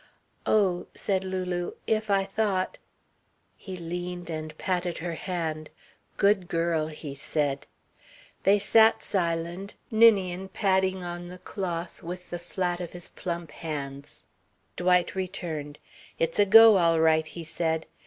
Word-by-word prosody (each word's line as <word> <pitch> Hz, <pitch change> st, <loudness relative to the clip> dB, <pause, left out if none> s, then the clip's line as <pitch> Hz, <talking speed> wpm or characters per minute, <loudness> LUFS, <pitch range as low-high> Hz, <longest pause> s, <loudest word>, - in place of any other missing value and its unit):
"Oh," 190 Hz, -5 st, +2 dB
said 190 Hz, -1 st, 0 dB
Lulu, 185 Hz, -2 st, -3 dB
"if 220 Hz, -1 st, 0 dB
I 195 Hz, -1 st, +3 dB
thought 195 Hz, -2 st, -1 dB, 0.4 s
" -, -, -43 dB, 0.3 s
He 190 Hz, -3 st, -8 dB
leaned 175 Hz, 0 st, -5 dB
and 155 Hz, -1 st, -5 dB
patted 180 Hz, -2 st, -1 dB
her 170 Hz, +1 st, -4 dB
hand. 160 Hz, -3 st, -4 dB, 0.5 s
"Good 200 Hz, -2 st, +3 dB
girl," 165 Hz, -2 st, 0 dB
he 150 Hz, -2 st, -7 dB
said. 140 Hz, 0 st, -2 dB, 0.7 s
They 200 Hz, +1 st, +5 dB
sat 220 Hz, +2 st, +5 dB
silent, 170 Hz, +1 st, -2 dB, 0.2 s
Ninian 195 Hz, -5 st, +4 dB
padding 190 Hz, -2 st, +1 dB
on 175 Hz, 0 st, -5 dB
the 180 Hz, +1 st, -9 dB
cloth 180 Hz, -2 st, -5 dB
with 180 Hz, +2 st, -8 dB
the 175 Hz, -, -3 dB
flat 175 Hz, 0 st, -2 dB
of 175 Hz, -2 st, -6 dB
his 175 Hz, -1 st, -7 dB
plump 170 Hz, -3 st, -5 dB
hands. 140 Hz, -3 st, -7 dB, 0.5 s
Dwight 180 Hz, 0 st, +2 dB
returned. 170 Hz, -6 st, -4 dB, 0.4 s
"It's 165 Hz, +3 st, -1 dB
a 205 Hz, -, +5 dB
go 225 Hz, 0 st, +9 dB
all 165 Hz, -2 st, +3 dB
right," 160 Hz, -1 st, +3 dB
he 170 Hz, -, -8 dB
said. 160 Hz, 0 st, -1 dB
175 Hz, 135 wpm, -27 LUFS, 165-190 Hz, 0.7 s, go